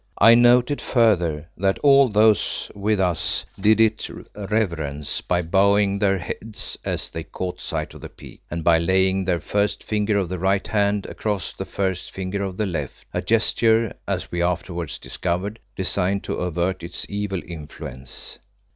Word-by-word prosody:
I 115 +3 +8
noted 120 +3 +5
further 90 - +2
that 95 +1 +1
all 140 -2 +6
those 105 0 +2
with 105 +1 0
us 90 -4 +1
did 110 +3 +4
it 110 -1 +2 0.3
reverence 85 -9 -2
by 90 -1 0
bowing 100 +3 +3
their 100 -1 +2
heads 105 +5 -5
as - - -3
they - - -5
caught 90 -1 -5
sight - - -3
of - - -12
the - - -8
peak, - - -14
and 85 0 -4
by 80 0 +5
laying 95 +2 +2
the 90 -2 +1
first 100 +6 -1
finger 105 -1 0
of 95 -3 0
the 90 +1 -4
right 95 +2 +1
hand 100 -1 +1
across 105 -5 -3
the - - -6
first 95 -2 -2
finger 95 +1 -4
of 95 -2 -4
the 110 - 0
left, 80 -8 -5
a - - -1
gesture, 115 0 +2
as - - -2
we 85 - -1
afterwards 85 -2 -2
discovered, 95 +5 -3 0.2
designed 95 +1 0
to - - -3
avert 90 +1 -1
its 85 +1 -4
evil 100 -2 -3
influence. 75 -5 -7
95 Hz, 165 wpm, -23 LUFS, 85-105 Hz, 0.3 s, I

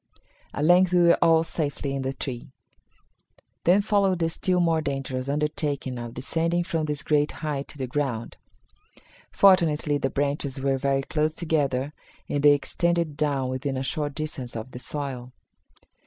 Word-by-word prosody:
At 145 - -1
length 180 +2 +5
we 175 -1 +5
were 170 0 +6
all 165 -1 +5
safely 145 -4 -3
in 135 - -2
the 130 0 -2
tree. 130 -2 -6 1.2
Then 185 +4 +5
followed 200 -3 +2
the 165 -1 0
still 180 +2 0
more 165 -2 +2
dangerous 135 -2 -3
undertaking 145 -3 -2
of 120 0 -7
descending 165 +6 0
from 165 -2 -2
this 150 -2 -3
great 150 -1 +2
height 140 -2 -2
to - - -11
the 135 - -2
ground. 125 -3 -3 0.9
Fortunately, 160 -6 +4
the 135 - 0
branches 140 -1 -2
were 135 0 0
very 135 0 +1
close 155 +2 -1
together 145 -4 0 0.3
and 145 - -1
they 145 0 +7
extended 170 +2 0
down 140 -3 0
within 130 +1 -2
a 130 - -2
short 145 0 -2
distance 145 -6 -5
of 115 +3 -6
the 125 - -8
soil. 130 -3 -5
145 Hz, 160 wpm, -25 LUFS, 135-165 Hz, 1.2 s, they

